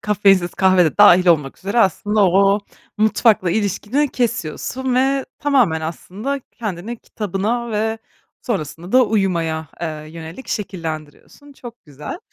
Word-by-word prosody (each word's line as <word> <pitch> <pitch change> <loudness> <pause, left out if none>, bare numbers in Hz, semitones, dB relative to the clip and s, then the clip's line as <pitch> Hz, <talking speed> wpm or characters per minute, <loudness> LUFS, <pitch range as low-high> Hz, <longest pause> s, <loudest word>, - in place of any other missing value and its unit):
kafeinsiz 195 -3 +3
kahve 185 -1 +4
de 160 - -2
dâhil 185 -3 +7
olmak 150 -6 +2
üzere 200 +5 -2
aslında 205 0 +2
o 195 +2 +4
o - - 0 0.4
mutfakla 215 -3 +3
ilişkini 215 - 0
kesiyorsun 245 - -2
ve 270 +1 +2
tamamen 250 - +2
aslında 200 - -5
kendini 215 +1 -5
kitabına 220 +4 -3
ve 220 +1 -1 0.4
sonrasında 175 - -4
da 255 0 +6
uyumaya, 170 -7 -1
eee, 170 - -2 0.2
yönelik 165 +8 -10
şekillendiriyorsun. 170 - -6
Çok 240 -3 -12
güzel. 150 - -8
200 Hz, 125 wpm, -19 LUFS, 170-235 Hz, 0.4 s, dâhil